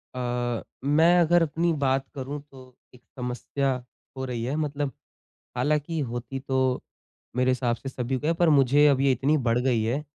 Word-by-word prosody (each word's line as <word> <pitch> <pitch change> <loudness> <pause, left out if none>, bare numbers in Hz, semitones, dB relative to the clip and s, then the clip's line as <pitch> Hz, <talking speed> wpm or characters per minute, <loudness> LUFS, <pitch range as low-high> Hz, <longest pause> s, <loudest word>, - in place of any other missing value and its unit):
अ, 120 -1 -2 0.2
मैं 160 +5 +5
अगर 175 +1 +4
अपनी 165 +2 0
बात 135 0 +1
करूँ 140 +2 -5
तो 130 -2 -15 0.2
एक 125 - -17
समस्या 130 +2 -2 0.5
हो 130 - -3
रही 120 -3 -4
है। 130 +4 -2
मतलब 145 -2 -2 0.7
हालाँकि 150 +5 0
होती 120 +2 -5
तो 130 -1 0 0.5
मेरे 125 0 +3
हिसाब 125 -2 0
से 135 +3 -7
सभी 130 0 -2
को 150 - -3
है 165 - +3
पर 175 -2 +5
मुझे 145 0 +5
अब 135 -2 +3
ये 135 -1 +4
इतनी 140 +5 +2
बढ़ 115 +1 +3
गयी 125 -3 +1
है 120 +7 0
135 Hz, 175 wpm, -26 LUFS, 125-145 Hz, 0.7 s, मैं